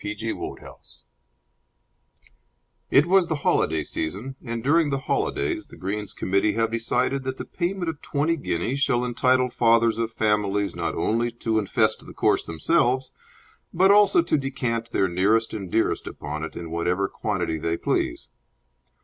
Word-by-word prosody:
3 105 Hz, -, -4 dB
A -, -, -2 dB
Mixed 110 Hz, +1 st, -3 dB
Threesome -, -, -10 dB, 1.8 s
It 140 Hz, -, +5 dB
was 185 Hz, 0 st, +4 dB
the 160 Hz, -, -1 dB
holiday 80 Hz, -1 st, +2 dB
season, 100 Hz, -, -3 dB
and 115 Hz, -2 st, -4 dB
during 155 Hz, +2 st, +3 dB
the 140 Hz, -, 0 dB
holidays 355 Hz, -, -1 dB
the -, -, -14 dB
Greens 100 Hz, +2 st, -4 dB
Committees 100 Hz, +1 st, 0 dB
have 115 Hz, 0 st, +1 dB
decided 125 Hz, +4 st, 0 dB
that 130 Hz, 0 st, -4 dB
the -, -, -6 dB
payment 180 Hz, 0 st, -3 dB
of 160 Hz, -3 st, -4 dB
twenty 155 Hz, +3 st, 0 dB
guineas 135 Hz, -, -2 dB
shall 125 Hz, -3 st, +1 dB
entitle 125 Hz, +1 st, +2 dB
fathers 115 Hz, -1 st, +3 dB
of 115 Hz, 0 st, -1 dB
families 105 Hz, -2 st, 0 dB
not -, -, -2 dB
only 115 Hz, +2 st, 0 dB
to 115 Hz, -1 st, -1 dB
infest 100 Hz, -, 0 dB
the -, -, -11 dB
course -, -, +2 dB
themselves, 125 Hz, -, +1 dB, 0.6 s
but 190 Hz, +3 st, +4 dB
also 200 Hz, -4 st, +5 dB
to 155 Hz, -3 st, +1 dB
decant 120 Hz, -4 st, -3 dB
their 95 Hz, -, +2 dB
nearest 100 Hz, +6 st, +1 dB
and 95 Hz, -5 st, -6 dB
dearest 115 Hz, -, 0 dB
upon 75 Hz, +2 st, -6 dB
it 80 Hz, -, -6 dB
in 85 Hz, -1 st, -7 dB
whatever 90 Hz, +4 st, 0 dB
quantity 90 Hz, -8 st, -2 dB
they 85 Hz, +1 st, -1 dB
please. -, -, -1 dB
115 Hz, 160 wpm, -24 LUFS, 100-135 Hz, 1.8 s, It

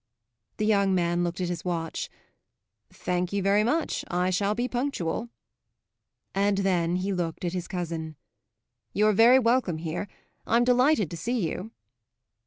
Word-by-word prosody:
The 210 Hz, -, 0 dB
young 200 Hz, -3 st, +3 dB
man 175 Hz, 0 st, +1 dB
looked 175 Hz, +1 st, -2 dB
at 180 Hz, -, 0 dB
his 175 Hz, -, -4 dB
watch. 165 Hz, -3 st, -3 dB, 0.8 s
"Thank 180 Hz, 0 st, -2 dB
you 200 Hz, -1 st, -1 dB
very 200 Hz, +2 st, +3 dB
much; 310 Hz, +8 st, 0 dB
I 180 Hz, +1 st, +1 dB
shall 200 Hz, +3 st, +1 dB
be 240 Hz, +2 st, -1 dB
punctual." 240 Hz, -5 st, -2 dB, 1.0 s
And 200 Hz, +1 st, +2 dB
then 180 Hz, -3 st, +1 dB
he 190 Hz, +2 st, -1 dB
looked 175 Hz, -1 st, -3 dB
at 175 Hz, -, -2 dB
his 180 Hz, -1 st, -3 dB
cousin. 165 Hz, -4 st, -4 dB, 0.8 s
"You're 215 Hz, +1 st, +3 dB
very 235 Hz, +5 st, +7 dB
welcome 235 Hz, -8 st, +2 dB
here. 165 Hz, +5 st, -4 dB, 0.4 s
I'm 235 Hz, +2 st, +4 dB
delighted 250 Hz, -, +3 dB
to 170 Hz, -, -5 dB
see 230 Hz, -2 st, -1 dB
you." 185 Hz, +6 st, -5 dB
190 Hz, 150 wpm, -27 LUFS, 175-220 Hz, 1.0 s, very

